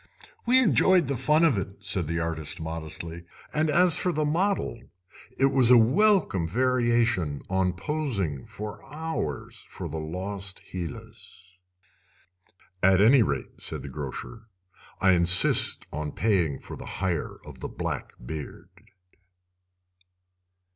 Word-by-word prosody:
"We 250 +2 +5
enjoyed 190 - +4
the 140 - -1
fun 150 +7 +3
of 135 -11 +3
it," 95 +1 -7
said 95 -4 0
the 85 +1 -2
artist 80 -3 -3
modestly, 80 +1 -6 0.3
"and 155 +1 +1
as 175 +2 +4
for 180 - +1
the 155 -2 -1
model, 170 - -1 0.6
it 135 +1 +3
was 130 -3 +4
a 125 - +8
welcome 130 - +3
variation 120 - +1
on 95 -1 +1
posing 95 - -2
for 105 0 -8
hours 155 - -5
for - - -6
'The 80 +2 -5
Lost 95 +4 -5
Hylas'." 95 -1 -9 1.2
"At 95 0 +5
any 120 +6 +6
rate," 70 -10 -3
said - - -4
the 70 - -7
grocer, 75 - -7 0.5
"I 95 - +4
insist 90 0 +5
on 75 0 -4
paying 90 -10 +1
for - - -9
the - - -10
hire 90 -4 -2
of - - -11
the - - -5
black - - -5
beard." 75 +3 -7
100 Hz, 130 wpm, -26 LUFS, 85-135 Hz, 1.2 s, a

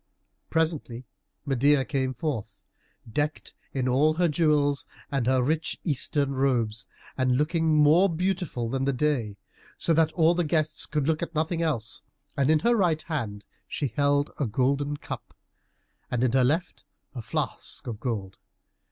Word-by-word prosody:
Presently 155 -7 -1 0.4
Medeia 140 +1 +3
came 130 -2 -1
forth, 135 -6 -4 0.5
decked 150 +1 -2 0.2
in 130 -2 -1
all 145 +5 +3
her 175 +1 +3
jewels 150 -3 +2 0.2
and 135 -4 0
her 130 -1 +3
rich 160 +4 0
Eastern 145 -2 0
robes, 120 -7 0 0.3
and 130 -1 +2
looking 160 +1 +2
more 155 +6 +5
beautiful 175 -8 -1
than 135 +3 -1
the 140 - +1
day, 125 -7 0 0.4
so 165 - +2
that 160 0 +3
all 165 0 +4
the 175 0 +1
guests 155 -1 0
could 150 -3 -1
look 160 +1 +1
at 170 -1 -5
nothing 160 +2 0
else. 125 -9 -2 0.3
And 140 -1 +2
in 155 - +5
her 240 +5 +3
right 170 -7 +1
hand 115 -11 -4 0.2
she 140 - -2
held 145 +4 +1
a 140 - +1
golden 140 +5 0
cup, - - -8 0.7
and 125 0 0
in 125 - +3
her 130 0 +3
left 160 +7 0 0.3
a 125 - -5
flask - - -4
of 115 -4 -5
gold. 105 -6 -4
145 Hz, 155 wpm, -26 LUFS, 130-160 Hz, 0.7 s, more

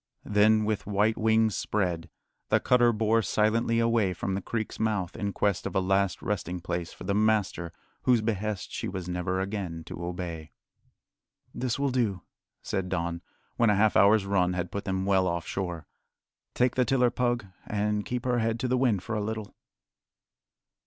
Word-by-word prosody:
Then, 105 +1 +4
with 105 -2 -2
white 105 +2 +2
wings 110 -1 +2
spread, 90 -5 -1 0.4
the - - +4
cutter 120 -1 +4
bore 110 0 +2
silently 115 +2 +1
away 115 -5 +2
from 95 +2 -2
the 95 - -2
creek's 110 +2 -4
mouth 105 -6 -1
in 100 -1 -2
quest 100 -1 0
of - - -7
a - - +4
last 95 0 +1
resting 90 -3 -2
place 85 -1 -4
for - - -11
the 100 - -1
master 105 -5 +1 0.3
whose 125 -3 +3
behest 105 -3 -2
she - - -3
was 95 -2 -5
never 90 +1 -1
again 95 -4 -3
to 85 +1 -7
obey. 85 -3 -5 1.0
"This 125 -3 -2
will 140 -1 0
do," 110 -8 0 0.4
said 95 -1 -2
Don, 85 -2 -2 0.4
when 115 -2 +4
a 105 - +4
half 105 +1 +3
hour's 100 +1 +5
run 90 -2 +2
had 90 -1 -3
put 100 - -4
them 95 -1 -1
well 95 -2 +3
off 85 -1 -2
shore. 90 -4 -4 0.7
"Take 125 0 +2
the 130 - +2
tiller, 125 0 +2
Pug, 120 -3 0 0.2
and 105 0 0
keep 125 +2 -4
her 125 -1 +2
head 115 0 0
to 130 - 0
the 125 +1 +1
wind 115 -8 +2
for - - -4
a 105 - 0
little." 110 -1 -4
105 Hz, 180 wpm, -28 LUFS, 90-110 Hz, 1.0 s, hour's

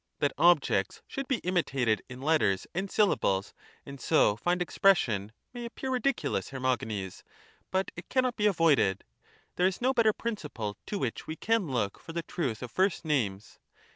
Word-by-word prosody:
That 145 - +1
objects 150 - +3
should 275 -1 -5
be 260 -2 0
imitated 135 - +1
in 130 +1 -9
letters 140 -12 +2
and 190 +3 -2
syllables, 100 - +1 0.3
and 140 -1 -9
so 155 -10 +4
find 175 +10 0
expression, 125 - +2 0.2
may 240 -1 -6
appear 255 +3 -5
ridiculous, 265 +2 0
Hermogenes, 110 -8 -2 0.5
but 190 +1 -1
it 175 - -10
cannot 255 -2 +1
be 210 - +2
avoided 155 - +3 0.3
— - - -33
there 180 - +4
is 190 - -2
no 255 +2 +2
better 230 -3 +4
principle 150 - -4
to 205 - -2
which 125 - -3
we 155 - -4
can 225 0 +1
look 115 -7 -1
for 165 - -10
the 170 0 -2
truth 130 -11 -3
of 120 - -7
first 190 -3 +1
names. 110 -10 -1
160 Hz, 170 wpm, -29 LUFS, -, 0.5 s, so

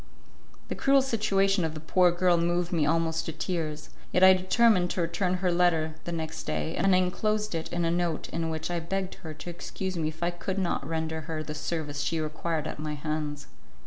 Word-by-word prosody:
The - - -1
cruel 275 0 +4
situation 195 -6 +2
of 160 -1 -2
the - - -5
poor 175 +3 +4
girl 175 0 +3
moved 175 +1 0
me 155 -4 +2
almost 165 0 +1
to - - -2
tears; 155 -2 -3 0.2
yet 180 - +3
I 190 0 +10
determined 185 0 +3
to 180 - -1
return 180 +2 0
her 180 -1 0
letter 170 -3 +2
the 175 - -3
next 160 -1 -4
day, 160 - -2
and 195 +1 +3
I - - +6
enclosed 210 +3 0
it 165 -1 -3
in 175 -1 0
a 165 - +2
note 170 -2 -1
in 165 0 -2
which 160 +2 -3
I 175 - 0
begged 190 +3 -3
her 160 -4 -7
to 155 +3 -8
excuse 185 +2 -5
me 160 -2 0
if 155 +2 -5
I 175 - +2
could 175 +2 -4
not 175 -7 -1
render 160 0 -2
her 155 0 -4
the 150 - -5
service 150 -1 -3
she 165 +2 0
required 155 +1 -2
at - - -5
my 150 0 -3
hands. 150 -1 -3
170 Hz, 215 wpm, -28 LUFS, 160-185 Hz, 0.2 s, I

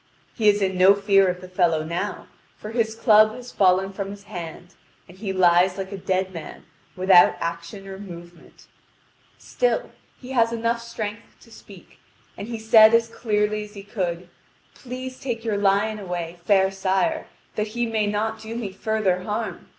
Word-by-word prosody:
He 215 -3 +3
is 205 -1 +2
in 190 -1 -1
no 190 +2 +7
fear 200 -1 +3
of 180 0 -2
the 185 - -9
fellow 175 -4 +1
now, 170 +6 -4 0.3
for 215 - -8
his 225 -1 -1
club 215 -1 +5
has 250 0 -10
fallen 190 0 +2
from 195 0 -4
his 200 0 -10
hand, 175 -1 -9 0.3
and 180 - -15
he 195 0 -4
lies 180 0 +3
like 190 0 -5
a - - -4
dead 190 0 -1
man 165 -2 -9 0.3
without 185 -1 +6
action 170 +4 -5
or 190 0 -8
movement; 175 -3 -12 0.7
still - - -1 0.3
he 255 0 -10
has 230 -3 +2
enough 230 0 -1
strength 220 -2 -7
to 230 - -19
speak, 195 -4 -15 0.4
and 205 - -7
he 235 -1 -4
said 220 0 +6
as 230 0 +2
clearly 210 -2 -1
as 210 0 -13
he 200 - -9
could: 180 -4 -4 0.5
"Please 255 0 -8
take 235 -3 -4
your 215 -3 0
lion 205 +2 +1
away, 175 -3 -5
fair 190 -2 +3
sire, 195 - -1 0.3
that 210 0 -2
he 240 - +1
may 220 -2 0
not 220 +2 -2
do 220 +1 -7
me 225 -5 -4
further 195 -2 -1
harm. 210 +3 -5
200 Hz, 175 wpm, -23 LUFS, 185-220 Hz, 0.7 s, no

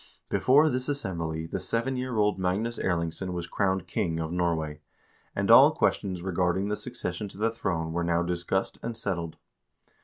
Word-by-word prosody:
Before 145 +5 +5
this 130 -1 -1
assembly 85 - -2
the - - -4
seven 120 +3 -1
year 125 -2 -3
old 105 -2 +2
Magnus 100 +6 -1
Erlingsson 85 +1 -1
was 85 -1 -3
crowned 95 -1 0
king 80 0 -1
of 80 0 -3
Norway, 80 -4 -1 0.5
and - - +1
all - - +9
questions 90 -3 0
regarding 95 +1 0
the 105 - 0
succession 105 -5 -4
to 95 - -12
the 110 +2 +1
throne 85 -7 -2
were 85 +1 0
now 85 0 +1
discussed 90 +2 -1
and 115 -1 -4
settled. 85 -5 -3
95 Hz, 165 wpm, -28 LUFS, 85-110 Hz, 0.5 s, all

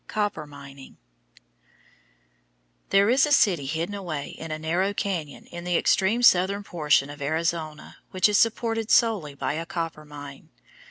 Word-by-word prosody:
COPPER 205 -8 -2
MINING 140 -1 -13 1.9
There 200 +1 +4
is 260 +5 +4
a - - -3
city 180 - +3
hidden 160 +7 -3
away 170 -8 -5
in 165 - -9
a 155 - -3
narrow 175 +6 -1
cañon 170 -9 -4
in 175 0 -7
the 175 -1 +1
extreme 215 +6 +2
southern 200 0 +4
portion 150 -6 +1
of 145 0 -11
Arizona 155 +1 -3
which 185 0 +3
is 210 -1 +3
supported 225 -1 0
solely 205 - +2
by 140 - -2
a 165 +2 -4
copper 165 -4 -4
mine. 145 -2 -11
170 Hz, 150 wpm, -25 LUFS, 150-200 Hz, 1.9 s, There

